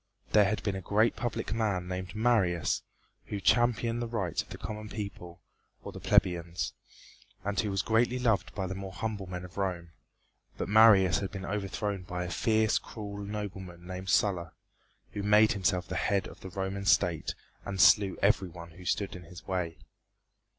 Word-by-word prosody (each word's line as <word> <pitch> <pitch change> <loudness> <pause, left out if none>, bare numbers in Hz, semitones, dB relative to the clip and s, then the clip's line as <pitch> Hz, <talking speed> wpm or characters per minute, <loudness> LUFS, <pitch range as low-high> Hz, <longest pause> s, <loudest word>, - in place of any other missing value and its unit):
There 105 -1 +6
had 105 +2 -1
been 100 - 0
a 95 - -4
great 105 +5 +2
public 115 -1 -3
man 105 -6 0
named 95 +2 -5
Marius 105 -7 +2 0.4
who 105 - -4
championed 120 +2 +2
the 120 - -2
rights 100 -8 -1
of - - -15
the - - -7
common 105 0 -6
people, 90 -5 -7 0.4
or - - -6
the - - -9
plebeians, 85 -1 +1 0.7
and 100 +1 -1
who 105 - +1
was 95 0 0
greatly 120 +3 +2
loved 115 -5 +1
by 95 - -2
the 95 - -3
more 95 0 -7
humble 105 -3 -4
men 90 0 -5
of 90 - -13
Rome, 90 -4 -2 0.7
but - - -2
Marius 105 -4 +6
had 95 - -3
been 95 -2 -6
overthrown 100 0 -2
by 90 -1 -4
a 90 - -5
fierce, 110 +4 +2
cruel 100 -2 -7
nobleman 95 -4 -6
named 95 +1 -6
Sulla, 85 -4 +2 0.6
who 100 - -4
made 105 +2 +5
himself 95 -3 0
the - - -3
head 100 -2 +1
of - - -11
the 95 - -8
Roman 95 +2 -3
State 85 -4 +2 0.3
and 95 -1 -5
slew 100 +1 +6
every 100 -2 +3
one 85 0 -10
who 90 +2 -13
stood 100 +1 -1
in 90 -1 -10
his 85 +1 -12
way. 90 -3 -2
100 Hz, 180 wpm, -30 LUFS, 90-105 Hz, 0.7 s, There